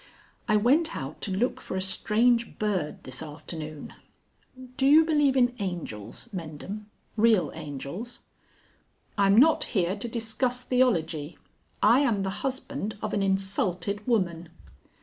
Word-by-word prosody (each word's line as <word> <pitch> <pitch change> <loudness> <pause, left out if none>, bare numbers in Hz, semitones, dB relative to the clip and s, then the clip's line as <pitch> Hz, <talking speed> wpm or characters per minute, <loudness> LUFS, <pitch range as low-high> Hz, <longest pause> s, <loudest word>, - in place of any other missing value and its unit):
"I 215 - +3
went 290 +10 +3
out 135 +3 -7
to 200 - -3
look 220 +7 0
for 185 - -5
a - - -1
strange 230 +5 +1
bird 190 -8 -2
this 130 -1 -6
afternoon.... 155 0 -7 0.8
Do 270 0 +2
you 310 +3 +7
believe 295 -4 +3
in 245 -1 +4
angels, 170 - -5
Mendham, 185 +5 -6 0.3
real 215 -8 +3
angels?" 155 - -6 1.0
"I'm 200 0 +4
not 310 +6 +6
here 180 +1 +2
to 210 +3 -5
discuss 235 +2 -2
theology. 175 - +1 0.5
I 245 - +6
am 230 -9 +1
the 190 - -1
husband 265 -5 -3
of - - -2
an 205 - +1
insulted 195 +1 -1
woman." 175 -8 0
205 Hz, 130 wpm, -27 LUFS, 170-245 Hz, 1.0 s, you